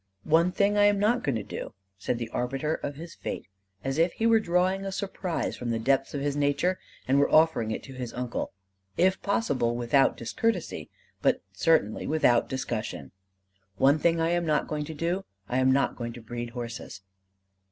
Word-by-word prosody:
"One 165 +3 +4
thing 200 +2 +2
I 205 - +6
am 205 0 +4
not 220 +5 +2
going 135 - 0
to 110 - -2
do," - - -7 0.2
said 120 - -1
the 115 -1 -4
arbiter 135 +6 -1
of 145 -2 -4
his 165 +3 -9
fate, - - -5 0.4
as 135 +3 -1
if 170 +2 +3
he 225 - -2
were 230 -1 +6
drawing 185 0 +1
a 195 - -3
surprise 190 -3 -3
from 120 - -5
the 115 - 0
depths 135 +5 +1
of 140 - -2
his 145 0 -1
nature 145 +6 +1 0.3
and 135 +2 +4
were 140 - +3
offering 155 -8 +4
it 110 - -3
to 135 - -10
his 125 -2 -5
uncle; 125 -1 -3 0.5
if 190 +1 +3
possible, 140 - 0
without 120 +3 +3
discourtesy, 230 -7 -2 0.3
but - - +2
certainly 110 0 +2
without 135 -6 +3
discussion 110 - -4 0.7
"one 140 +6 +4
thing 165 +1 +2
I 165 0 +2
am 175 0 +1
not 155 -2 +1
going 150 -1 -2
to 160 +1 -7
do; 170 +5 -1 0.2
I 125 - 0
am 130 0 +4
not 135 +1 +2
going 120 -1 -5
to 120 - -10
breed 120 +1 -5
horses." 120 -4 -6
145 Hz, 195 wpm, -27 LUFS, 125-175 Hz, 0.7 s, I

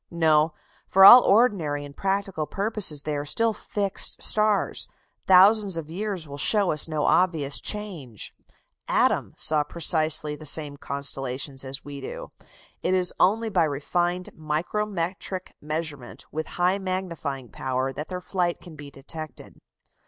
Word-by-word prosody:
No, 160 -2 +2 0.3
for 195 0 +6
all 245 +5 +12
ordinary 190 -12 +2
and 140 0 -12
practical 195 -5 -2
purposes 200 -8 -1
they 150 -1 -2
are 145 - -2
still 225 +10 0
fixed 205 -2 -2
stars; 210 -1 +2 0.4
thousands 195 0 +6
of 160 -1 -6
years 190 -3 -4
will 140 0 -9
show 205 +3 +2
us 150 0 +4
no 155 -2 -2
obvious 160 -6 +2
change; 170 - -4 0.5
"Adam" - - +1
saw 155 -1 +2
precisely 155 -1 -1
the 155 - -12
same 145 -1 0
constellations 135 -1 -4
as 135 +1 -6
we 140 -1 -8
do: - - -8 0.5
it 185 - +1
is 180 -1 +1
only 220 +4 +2
by 185 -4 +1
refined 175 +5 -1
micrometric 180 +3 -3
measurement 150 -4 -5
with 155 +1 -4
high 180 +2 +2
magnifying 170 -9 -4
power 130 0 -3
that 150 +4 -5
their 180 -1 -5
flight 180 -2 -1
can 170 -3 -12
be 145 -1 -10
detected. 155 +3 -9
165 Hz, 140 wpm, -25 LUFS, 145-190 Hz, 0.5 s, all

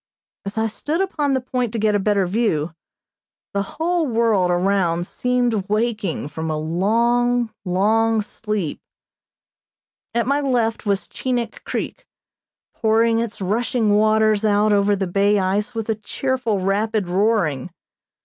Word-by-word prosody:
As 200 - -5
I 220 - +2
stood 295 +9 -2
upon 300 -8 0
the - - +2
point 250 -2 -2
to - - -2
get 215 -1 +2
a 205 - +2
better 200 -1 +2
view, 175 -6 0 0.8
the 200 - +1 0.2
whole 335 0 +1
world 225 -6 +2
around 175 -1 +1
seemed 245 -4 0
waking 210 -7 -1
from 160 +1 -4
a 155 - -1
long, 235 +8 +1
long 215 +4 +2
sleep. 210 -6 -4 1.3
At 235 - +2
my 280 +3 +1
left 235 -5 0
was 200 -1 0
Chinik 245 -3 -3
Creek, - - -4 0.7
pouring 225 +1 +2
its 230 -3 -4
rushing 215 +2 +1
waters 215 0 +3
out 210 0 +3
over 205 0 +3
the 195 -1 -1
bay 200 +3 +2
ice 200 +4 -1
with 225 -1 -3
a 220 - +2
cheerful, 250 -2 -1
rapid 205 +1 0
roaring. 180 - +1
215 Hz, 140 wpm, -21 LUFS, 195-235 Hz, 1.3 s, waters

